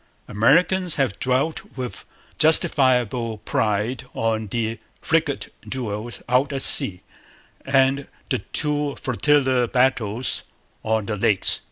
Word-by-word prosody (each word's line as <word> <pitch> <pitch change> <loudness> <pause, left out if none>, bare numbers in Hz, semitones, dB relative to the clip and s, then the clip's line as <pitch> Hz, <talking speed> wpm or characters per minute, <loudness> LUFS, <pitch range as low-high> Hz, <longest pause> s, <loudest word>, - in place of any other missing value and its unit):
Americans 175 - +2
have 125 -8 -1
dwelt 130 +5 -1
with 125 -2 -6 0.3
justifiable 125 -7 +3
pride 105 +3 -2
on 110 -1 -1
the 115 +1 -3 0.2
frigate 160 -3 -1 0.2
duels 120 -2 -4
out 130 +3 +1
at 135 -1 0
sea 90 -2 +6 0.7
and 135 0 +2 0.2
the - - 0
two 150 -1 -1
flotilla 130 -1 +1
battles 125 -2 0 0.4
on 110 -1 -1
the 105 - -3
Lakes. 105 -2 +1
125 Hz, 110 wpm, -22 LUFS, 110-140 Hz, 0.7 s, sea